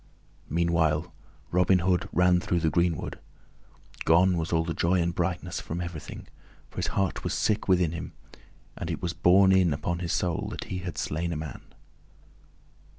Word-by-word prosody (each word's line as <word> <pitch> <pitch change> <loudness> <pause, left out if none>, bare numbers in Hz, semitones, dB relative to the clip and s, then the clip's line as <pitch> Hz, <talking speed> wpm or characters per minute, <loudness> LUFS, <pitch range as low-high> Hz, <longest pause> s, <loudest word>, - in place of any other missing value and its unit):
Meanwhile 85 0 +1 0.4
Robin 90 +1 +4
Hood 90 0 0
ran 90 0 +4
through 90 -3 -1
the 80 -1 +1
greenwood. 85 -2 0 0.8
Gone 90 +3 +4
was 80 -1 -2
all 80 -1 +2
the 80 0 -3
joy 90 +3 +1
and 85 0 0
brightness 90 +1 -2
from 85 - -5
everything, 85 -3 -7 0.4
for - - -19
his - - 0
heart 95 -1 0
was - - -2
sick 105 -1 0
within 90 -4 +3
him, 85 - -6 0.6
and - - -5
it - - -3
was 85 -2 -3
borne 90 +4 +5
in 95 -4 +4
upon 85 +4 -2
his 85 -1 -3
soul 85 -3 -1
that - - -6
he 90 - -5
had 90 -3 -6
slain 85 +3 -2
a - - -2
man. 75 -1 -6
85 Hz, 170 wpm, -27 LUFS, 80-90 Hz, 0.8 s, borne